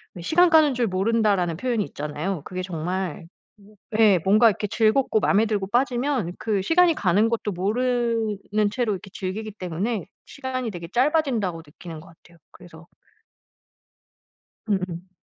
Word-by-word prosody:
왜 175 - -8
"시간 350 - +4
가는 310 -4 +5
줄 240 -2 0
모른다."라는 195 -3 +1
표현이 235 -2 0
있잖아요. 150 +4 -4
그게 185 +2 -5
정말 180 0 -4 0.7
예. 205 -5 +6
뭔가 215 +4 +6
이렇게 210 0 -3
즐겁고 220 +2 +2
맘에 210 +1 +3
들고 205 -3 -1
빠지면 245 -5 0
그 210 -3 0
시간이 340 - +4
가는 205 - +2
것도 220 -3 -2
모르는 215 0 0
채로 235 -1 -1
이렇게 195 0 -8
즐기기 205 +3 -4
때문에 190 +2 -3 0.2
시간이 260 -3 -4
되게 170 -3 -7
짧아진다고 245 - 0
느끼는 160 +2 -10
것 165 - -14
같아요. 170 +1 -21
그래서. 170 -2 -15 1.8
음음. 185 -3 -3
210 Hz, 325 characters per minute, -24 LUFS, 180-240 Hz, 1.8 s, 예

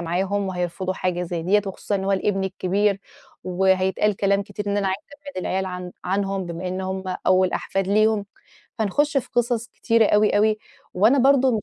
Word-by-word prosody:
معاهم 190 +4 -1
وهيرفضوا 180 +1 -3
حاجة 180 -1 -1
زي 170 -1 -3
ديَّة، 200 +4 +3
وخصوصًا 195 +1 -3
إن 190 -1 -1
هو 195 - +1
الابن 195 0 0
الكبير 195 +2 0 0.4
وهيتقال 190 +2 +1
كلام 200 0 +2
كتير، 210 0 -7
إن 200 0 0
أنا 200 -1 0
عايزة 190 +1 -2 0.2
أبعِّد 285 -7 -7
العيال 190 +1 -1
عن 180 -1 -6
عنهم، 195 +1 -1
بمّا 170 +2 -5
إنَّهم 190 +1 -3 0.2
أوَل 185 0 +4
أحفاد 195 -1 -2
ليهُم، 215 0 +2 0.5
فنِخُش 285 +8 +1
في 265 - 0
قصص 240 -1 0
كتيرة 230 -2 +2
أوي 210 0 +4
أوي، 215 +1 +3 0.4
وأنا 220 +9 +4
برضه 265 0 +5
مش 210 - -3
195 Hz, 175 wpm, -23 LUFS, 185-210 Hz, 0.5 s, برضه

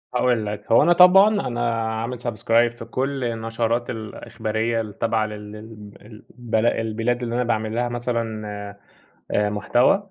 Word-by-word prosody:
هاقول 120 -3 +1
لك، 105 +1 -6
هو 115 - +6
أنا 175 +3 +5
طبعًا 185 +3 +7 0.2
أنا 115 -2 -1
عامل 120 +1 -4
subscribe 120 0 +1
في 115 - -8
كل 135 +3 -2
النشرات 115 +1 -2
الإخبارية 110 0 -3
التابعة 110 +1 -1
لل 105 0 -9
ال 105 -1 -11 0.5
البل 115 -2 0
البلاد 115 +2 0
اللي 120 0 -3
أنا 125 - +1
باعمل 110 -2 -1
لها 120 +1 0
مثلًا 115 -3 -3 0.8
آآ 105 0 +1
محتوى، 125 - +1
115 Hz, 145 wpm, -22 LUFS, 110-120 Hz, 0.8 s, طبعًا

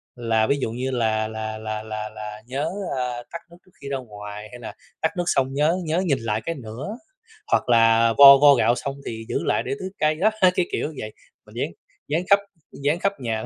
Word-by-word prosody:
là 115 -2 +1
ví 140 - +2
dụ 110 - -2
như 130 +3 -3
là 110 -3 0
là 110 0 -5
là 110 0 -5
là 110 0 -5
là 105 0 -8
"Nhớ", 140 +5 -2 0.3
à, 125 -1 -3
"tắt 170 - -5
nước 170 - -15
trước 185 - -24
khi 140 - -7
ra 135 - -1
ngoài." 105 -3 -9
Hay 125 - -10
là 115 - -8 0.3
"Tắt 160 - +2
nước 175 - +1
xong 135 -3 +1
nhớ 150 +5 +2
nhớ 165 +3 0
nhìn 140 -6 +1
lại 110 -1 -2
cái 165 - -2
nữa." 130 - -7 0.5
Hoặc - - +2
là 115 -1 +5
"Vo 140 -1 +11
vo 145 0 +7
gạo 120 -1 +3
xong 140 +1 -4
thì 110 -1 -6
giữ - - -1
lại - - +1
để 130 - -3
tưới 185 - -5
cây." 155 0 +2
Đó, 200 +7 +3
cái 180 -1 +4
kiểu - - -1
như 155 - -9
vậy, 110 0 -6 0.3
mình - - -17
dán - - -2 0.4
dán 160 +5 0
khắp 200 - +7 0.3
dán 145 +4 -1
khắp 200 +1 +1
nhà. 110 -2 -2
125 Hz, 230 wpm, -23 LUFS, 110-150 Hz, 0.5 s, Vo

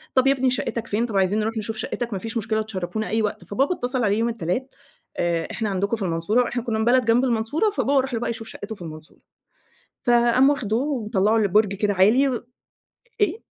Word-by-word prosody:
طب 260 +1 +4
يا 275 - +6
ابني 265 -1 +1
شَقتك 235 -2 -2
فين؟ 220 +3 0
طب 220 -5 -2
عايزين 195 +3 +2
نروح 220 +1 -2
نشوف 220 +1 -3
شَقتك؟ 235 +1 -4
ما 195 - -2
فيش 225 +4 -4
مشكلة 220 0 0
تشرفونا 215 0 -4
أي 225 +1 +1
وقت. 215 +1 -2
فبابا 275 - 0
اتصل 250 -2 -1
عليه 205 0 +2
يوم 230 +1 +1
التلات، 230 +5 -3 0.4
آآ 170 -1 0
إحنا 220 -3 -2
عندكم 200 +3 -1
في 205 - -4
المنصورة 180 +8 +1
وإحنا 240 -1 -3
كنّا 225 -2 -2
من 220 - +1
بلد 250 0 +4
جنب 230 +3 +3
المنصورة 250 - +1
فبابا 285 -8 +2
راح 265 -1 -6
له 230 - 0
بقى 240 - -2
يشوف 225 -1 -5
شَقته 220 0 -7
في 190 - -18
المنصورة. 155 -1 -9 0.8
فقام 240 +2 +4
واخده 250 -7 0
ومطلعه 225 -6 +1
لبرج 205 -1 +3
كده 205 +1 0
عالي 225 +9 +4
و 240 -1 -4 0.8
إيه؟ 415 +2 +1
225 Hz, 210 wpm, -23 LUFS, 205-245 Hz, 0.8 s, يا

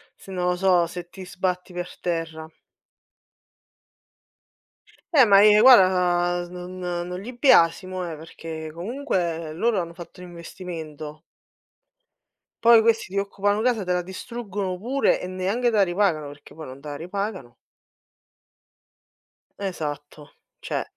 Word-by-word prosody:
se 195 - -13
non 180 -1 -1
lo 180 - +1
so, 180 -2 +3
se 175 +1 -8
ti 190 +1 -10
sbatti 180 0 -3
per 175 0 -6
terra. 165 -2 -3 2.6
Eh, 280 -4 +7
ma 200 -2 +6
e 210 0 +7
guarda 180 -6 +5
non 180 +1 -8
non 180 0 -4
li 245 +5 -8
biasimo, 185 - +3
eh, 155 - -7
perché 160 0 -8
comunque 170 - -3
loro 215 +5 +1
hanno 170 -1 -5
fatto 175 +1 -12
un 180 - -9
investimento. 160 -3 -8 1.4
Poi 230 -1 +8
questi 225 0 +2
ti - - -2
occupano 205 +1 0
casa, 235 -3 +1
te 180 - -3
la 180 - +1
distruggono 190 0 -5
pure 255 +8 +1
e - - -5
neanche 190 +7 0
te 230 - -1
la 205 - +5
ripagano, 175 -5 0
perché 145 0 -13
poi 160 -1 -8
non 130 +1 -10
te 150 - -10
la 145 - -5
ripagano. 185 - -5 2.1
Esatto, 150 -6 -6 0.3
cioè - - -3
180 Hz, 135 wpm, -24 LUFS, 165-200 Hz, 2.6 s, Poi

